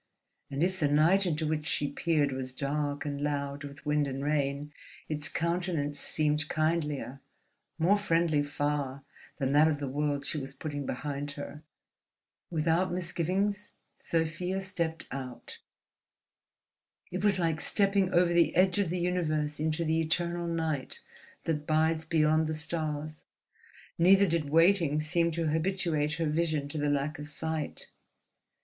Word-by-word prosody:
And 140 +3 -1
if 190 +1 0
the 150 - +3
night 165 +7 +4
into 160 -1 -1
which 155 0 -1
she 145 - +1
peered 150 -2 +1
was 130 -1 -5
dark 145 +1 -2
and 145 -1 -3
loud 140 -1 -2
with 145 +1 -10
wind 150 -1 +2
and 135 0 -4
rain, 145 0 -1 0.3
its 150 0 -2
countenance 170 -4 -1
seemed 150 0 0
kindlier, 150 -4 -1 0.6
more 185 +6 +3
friendly 165 -5 +2
far 145 -2 -2 0.3
than 135 -2 0
that 150 +2 +6
of 155 -2 +1
the 140 -1 -4
world 145 +1 -1
she 150 +2 -1
was 135 0 -7
putting 145 -3 -4
behind 145 +2 -3
her. 145 +1 -8 0.9
Without 165 +3 +1
misgivings 185 +4 -1 0.3
Sofia 170 +3 -1
stepped 170 -4 -3
out. 130 -3 -7 1.5
It 185 +2 -3
was 205 -2 +4
like 165 -3 0
stepping 195 -2 +2
over 175 0 +4
the 170 -1 +3
edge 185 +2 +4
of 195 -4 +1
the 180 - -1
universe 155 -4 0
into 155 +2 0
the 160 +1 +2
eternal 170 +1 0
night 160 -5 -2 0.4
that 150 -2 -2
bides 160 +1 +2
beyond 155 0 +3
the 155 - -2
stars. 155 -1 -3 0.8
Neither 190 +3 +6
did 165 -5 0
waiting 165 -1 +4
seem 170 +2 +1
to 165 -1 0
habituate 160 -2 0
her 165 +1 -1
vision 155 -2 0
to 150 - -4
the 145 0 +1
lack 145 +2 -1
of 150 0 -6
light. 160 -2 -1
155 Hz, 145 wpm, -30 LUFS, 145-170 Hz, 1.5 s, that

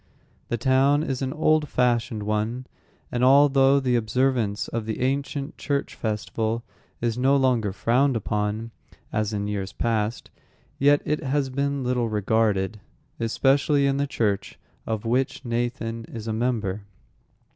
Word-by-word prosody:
The 120 - -1
town 135 +4 +3
is 135 -5 -3
an 130 -1 -1
old 155 -1 +2
fashioned 120 -3 +1
one, 110 +4 -2 0.5
and 125 0 -1
although 135 0 +5
the 125 -2 +1
observance 120 -2 0
of 115 -2 -4
the 110 - -3
ancient 140 +2 -2
church 140 -1 -2
festival 110 +1 -2 0.4
is 120 0 -1
no 135 +2 +4
longer 125 -6 +2
frowned 125 +7 +2
upon, 105 +1 -2 0.4
as 110 -1 0
in 100 -1 -2
years 100 -2 -3
past, 115 -1 -1 0.5
yet 145 +1 +4
it 150 +1 -1
has 135 -1 0
been 140 +1 -1
little 125 -2 0
regarded, 105 -1 +1 0.4
especially 140 +5 +2
in 135 0 +1
the 140 0 0
church 105 -8 -1 0.3
of 110 -1 -2
which 130 +3 0
Nathan 115 -1 -2
is 115 -1 -8
a 110 - -1
member. 110 -4 -1
120 Hz, 140 wpm, -25 LUFS, 110-135 Hz, 0.5 s, although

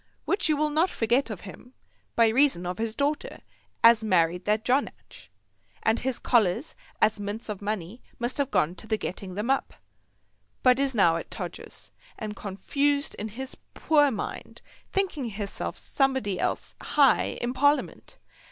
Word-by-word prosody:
Which 395 -5 +1
you 305 - +3
will 300 0 +1
not 320 +5 +3
forget 240 +1 +1
of 210 -5 -6
him, 245 +6 -12 0.4
by 230 -1 +5
reason 250 -6 +3
of 180 +2 -4
his 225 0 -2
daughter 290 +1 -2 0.4
as 230 -1 +7
married 180 -3 +2
that 215 +1 +1
Jonadge, 265 +3 -2 0.5
and 220 +1 +2
his 260 -1 -2
collars 230 - +1 0.3
as 215 0 +3
mints 205 +3 -5
of 210 -2 -4
money 205 +1 -4 0.2
must 240 +3 -3
have 280 -2 +1
gone 165 - +2
to 220 - -10
the 220 - +1
getting 185 -2 -5
them 215 +6 0
up; 270 - -1 0.9
but 255 0 +5
is 275 -2 0
now 170 -6 +4
at - - -7
Todgers's, - - -8 0.3
and 210 -1 -5
confused 280 +10 -1
in 210 - -3
his 260 +5 -7 0.2
poor 295 -3 +4
mind, 220 -6 -6 0.3
thinking 370 -9 0
hisself 205 -3 -4
Somebody 265 -9 0
else - - -2
high 280 -3 +3
in 240 +1 -2
Parliament. 285 +3 0
230 Hz, 160 wpm, -27 LUFS, 205-275 Hz, 0.9 s, as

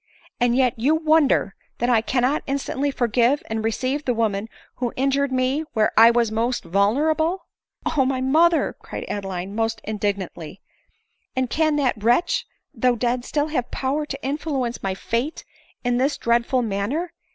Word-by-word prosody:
and 240 -1 +2
yet 255 -2 +3
you 285 +7 +3
wonder 315 -9 +3 0.2
that 240 - 0
I 235 -3 +4
cannot 255 +5 +1
instantly 280 0 -1
forgive 245 +2 +1
and 220 0 -1
receive 255 +6 -1
the 250 -3 0
woman 220 -2 0 0.3
who 245 -2 -1
injured 275 +1 +1
me 260 +4 +1
where 215 -1 +2
I 225 +1 +8
was 235 -2 +2
most 235 +3 -1
vulnerable," 300 - +1 0.2
" - - -37
O 275 - +4
my 260 0 0
mother 320 +6 +3
!" - - -42
cried - - -7
Adeline, 195 -2 -4
almost 225 +2 -1
indignantly, 200 -4 -4 0.4
" - - -48
and 260 -1 -1
can 310 -1 +2
that 255 -7 0
wretch, 290 +10 +2 0.3
though 250 -1 +2
dead, 240 +1 -1
still 295 +3 -1
have 250 -6 -2
power 285 +3 -2
to 275 -1 -6
influence 275 -4 -2
my 190 -1 -2
fate 235 +10 -3 0.4
in 245 -1 +1
this 270 +4 +1
dreadful 235 +2 +1
manner? 230 - -2
250 Hz, 165 wpm, -23 LUFS, 225-280 Hz, 0.4 s, I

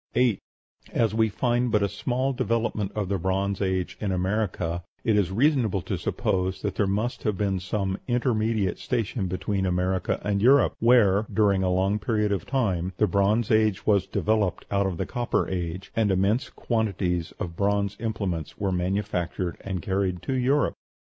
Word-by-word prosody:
8. 120 -4 +3 0.5
As 115 -2 +2
we 110 0 +2
find 120 +3 0
but 105 -2 +3
a - - +3
small 130 +6 -1
development 115 -5 -1
of 105 -3 -1
the 100 0 -1
Bronze 95 +2 -1
Age 95 -2 -1
in 105 -2 -1
America, 90 -2 -1 0.2
it 110 - +2
is 100 -4 +2
reasonable 115 - +2
to - - -2
suppose 95 0 -1
that 100 -2 -1
there 100 - +1
must 105 +6 -1
have 105 -4 -1
been 100 -2 0
some 95 +1 -2
intermediate 115 -5 0
station 115 -4 -2
between 95 +2 -2
America 90 0 0
and 100 -1 0
Europe, 135 +4 +5
where, 110 -4 +4
during 100 -3 +3
a 95 - +1
long 95 +3 +1
period 105 -2 0
of 100 - -2
time, 95 -9 0
the 105 - +4
Bronze 105 +2 +1
Age 110 -3 +2
was 100 -3 +3
developed 105 -4 0
out 100 -1 +2
of 90 -3 -3
the - - -2
Copper 120 -1 -1
Age, 90 0 -4
and 110 -2 +2
immense 100 +6 +1
quantities 95 -7 -1
of 85 -5 -6
bronze 100 +1 0
implements 95 -9 -3
were 100 -2 -1
manufactured 90 -1 -2
and 95 -4 -4
carried 95 -2 -1
to 135 - -2
Europe. 130 +2 +2
100 Hz, 170 wpm, -26 LUFS, 95-110 Hz, 0.5 s, Europe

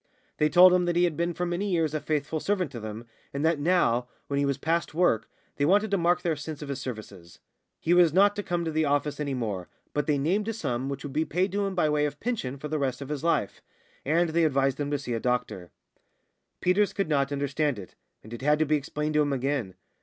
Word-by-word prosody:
They 150 - +3
told 180 +4 +8
him 180 -1 +3
that 175 -1 0
he 175 - +3
had 170 -3 +1
been 170 +1 -1
for 180 - -1
many 175 +4 -2
years 165 -4 +1
a 155 - 0
faithful 155 +1 -2
servant 185 -3 -1
to 120 - -6
them, 110 +1 -7 0.3
and 140 +3 0
that 165 -2 +2
now 145 -7 +2 0.2
when 140 0 -1
he 140 - +1
was 140 -1 0
past 165 +2 -1
work 165 -11 +2 0.3
they 145 - 0
wanted 200 +7 +3
to 200 - +3
mark 175 +1 +2
their 165 -3 +1
sense 150 0 -7
of 145 - -8
his 140 -1 -4
services. 105 -9 -8 0.4
He 170 - +1
was 175 -2 +6
not 200 +4 +4
to 205 - -2
come 175 -3 -2
to 160 - -1
the 160 0 +1
office 145 0 0
any 140 -2 -2
more, 105 -7 -3 0.2
but 150 - -1
they 150 -2 +2
named 185 +10 0
a 225 - -1
sum 135 - -3
which 140 -1 -5
would 145 -2 -6
be 155 +2 +1
paid 185 +5 -1
him 200 -1 -1
by 175 -4 +2
way 150 0 +2
of 145 - -8
pension 205 - -3
for 150 - -6
the 155 0 -2
rest 130 -3 -1
of 140 -1 -7
his 150 -1 -4
life. 165 -11 0 0.4
And 165 +4 +2
they 165 +1 +2
advised 135 -3 +1
him 145 -1 -1
to 145 - 0
see 130 -3 -5
a 115 - -1
doctor. 125 -8 -2 0.9
Peters 195 +3 +2
could 195 - -1
not 140 -2 +1
understand 145 -1 -1
it, 95 -5 -10 0.3
and 110 - -11
it 120 - -7
had 150 +2 +3
to 155 - +2
be 155 +1 +2
explained 150 +2 -3
to 150 - +4
him 145 -1 +1
again. 130 -7 -1
150 Hz, 250 wpm, -27 LUFS, 135-175 Hz, 0.9 s, told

